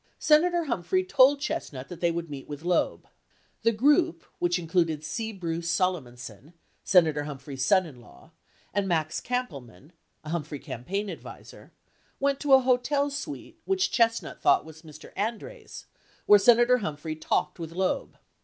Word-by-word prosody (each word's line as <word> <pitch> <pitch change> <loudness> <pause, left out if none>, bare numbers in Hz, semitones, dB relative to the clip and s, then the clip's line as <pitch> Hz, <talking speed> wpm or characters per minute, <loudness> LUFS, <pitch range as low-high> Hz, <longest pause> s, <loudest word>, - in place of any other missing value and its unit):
Senator 340 +3 +3
Humphrey 290 - -1
told 285 -6 +5
Chestnut 280 - -4
that 175 -2 -10
they 170 - +3
would 170 0 -3
meet 140 -3 -8
with 145 +1 -8
Loeb. 175 0 0 0.5
The 230 - +3
group, 295 +9 +2
which 175 0 +1
included 165 -3 0
C. 225 +8 -4
Bruce 170 -4 -4
Solomonson, 135 - -3 0.3
Senator 160 -6 +3
Humphrey's 135 -2 -6
son 185 +7 +4
in 135 -7 -12
law, 160 - -18 0.4
and 200 -1 0
Max 160 -3 -1
Kampelman, 145 - -5 0.3
a 155 - -8
Humphrey 155 -3 -3
campaign 190 - -4
advisor, - - -10 0.5
went 275 0 +1
to 285 -2 +2
a 265 - +8
hotel 270 +3 +1
suite 285 +1 -7
which 385 0 +1
Chestnut 230 -1 0
thought - - +4
was 160 0 -13
Mr. 155 -3 -14
Andreas' 235 - -5 0.4
where 205 - +7
Senator 240 +3 +5
Humphrey 155 -4 -4
talked 160 +2 -1
with 165 -1 -6
Loeb. 185 +2 -2
180 Hz, 150 wpm, -27 LUFS, 155-250 Hz, 0.5 s, a